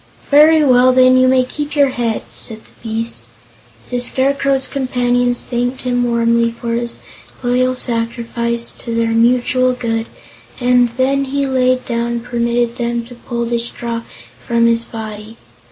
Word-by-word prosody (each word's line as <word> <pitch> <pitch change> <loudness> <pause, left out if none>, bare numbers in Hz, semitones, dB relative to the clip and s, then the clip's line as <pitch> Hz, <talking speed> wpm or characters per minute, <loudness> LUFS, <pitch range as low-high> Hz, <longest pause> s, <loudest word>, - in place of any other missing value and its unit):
"Very 305 +2 +6
well, 255 -2 +5
then; 255 0 +5
you 255 0 +5
may 255 0 +4
keep 295 +3 -5
your 285 -2 +4
head," 235 -3 -2
said 220 -1 -3
the - - -23
beast. 225 - -4 0.7
The 245 - 0
Scarecrow's 270 +2 +1
companions 245 -2 0
thanked 245 +1 -2
him 245 -1 0
warmly 235 -1 +2
for 230 0 -5
his 235 0 -3 0.5
loyal 255 +1 +1
sacrifice 235 -1 -2
to 230 -1 -5
their 230 0 +1
mutual 250 +3 +2
good, 225 -2 -2 0.5
and 245 -1 +3
then 275 +1 +1
he 280 +1 -1
laid 255 -1 +1
down 235 0 -2
and 235 -1 -4
permitted 235 0 -1
them 235 -1 -2
to 245 - -12
pull 235 0 -4
the 235 0 -1
straw 235 0 -5 0.5
from 235 0 +2
his 230 0 +2
body. 215 0 -8
245 Hz, 155 wpm, -16 LUFS, 235-255 Hz, 0.7 s, Very